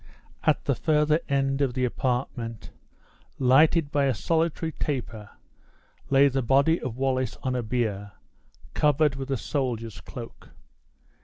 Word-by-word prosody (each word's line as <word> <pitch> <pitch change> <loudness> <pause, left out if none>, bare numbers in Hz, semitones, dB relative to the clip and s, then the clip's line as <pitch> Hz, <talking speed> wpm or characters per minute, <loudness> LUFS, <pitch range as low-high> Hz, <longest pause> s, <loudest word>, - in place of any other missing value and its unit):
At - - +1
the - - +2
further 155 0 +2
end 135 0 +1
of 130 -3 0
the 130 -1 +1
apartment, 120 -2 -3 0.7
lighted 145 +4 +4
by 145 -1 +2
a 135 -3 +1
solitary 165 +3 0
taper, 120 -9 -4 0.8
lay 140 +1 +5
the 135 0 0
body 140 +7 +3
of 125 -2 -5
Wallace 130 -2 -1
on 130 - -1
a 125 - 0
bier, 105 -4 -2 0.6
covered 150 0 +3
with 135 0 -6
a 135 - 0
soldier's 115 -6 -3
cloak. 120 -2 -10
135 Hz, 135 wpm, -26 LUFS, 120-145 Hz, 0.8 s, lay